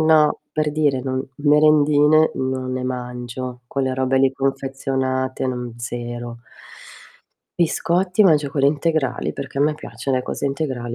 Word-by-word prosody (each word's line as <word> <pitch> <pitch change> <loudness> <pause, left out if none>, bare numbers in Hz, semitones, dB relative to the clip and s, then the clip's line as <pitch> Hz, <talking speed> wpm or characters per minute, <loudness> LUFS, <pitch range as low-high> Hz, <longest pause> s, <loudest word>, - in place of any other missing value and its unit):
eNo, 155 -1 +4
per 155 -1 -1
dire 145 -3 +1
non 130 0 -2 0.2
merendine 150 +1 +5
non 130 -1 -2
ne 130 0 -3
mangio, 125 0 -5
quelle 130 0 -1
robe 130 0 0
lì 135 0 +3
confezionate 135 -1 -2
non 125 -2 -4
0. 120 0 -5 1.2
Biscotti 180 +3 +2
mangio 155 -7 +4
quelli 140 0 +2
integrali, 145 -4 -1
perché 135 0 -6
a - - +1
me 150 +1 +3
piaccion 140 -2 -4
le 130 - 0
cose - - -4
integrali, 130 -4 -3
135 Hz, 135 wpm, -21 LUFS, 130-150 Hz, 1.2 s, merendine